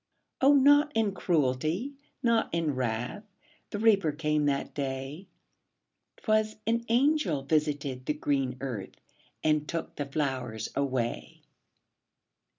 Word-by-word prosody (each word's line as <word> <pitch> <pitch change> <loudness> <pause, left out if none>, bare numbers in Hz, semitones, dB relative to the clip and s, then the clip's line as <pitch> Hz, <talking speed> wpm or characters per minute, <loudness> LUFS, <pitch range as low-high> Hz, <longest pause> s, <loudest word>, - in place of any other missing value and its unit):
O, 280 +2 +6
not 290 +2 +5
in 220 -2 +2
cruelty, 160 - 0 0.3
not 230 -2 +2
in 165 -3 0
wrath, 125 - -2 0.5
The - - -4
Reaper 200 -7 +4
came 150 0 0
that 140 -1 -1
day; 135 +5 -4 0.9
'Twas 215 -1 +1
an 230 +1 +1
angel 240 - +2
visited 145 -3 -1
the 150 - +1
green 135 -4 -1
earth, 120 -8 -5 0.5
And 150 -1 +2
took 165 - -4
the 145 - -3
flowers 130 -6 -2
away. 130 -4 -2
150 Hz, 115 wpm, -29 LUFS, 135-215 Hz, 0.9 s, O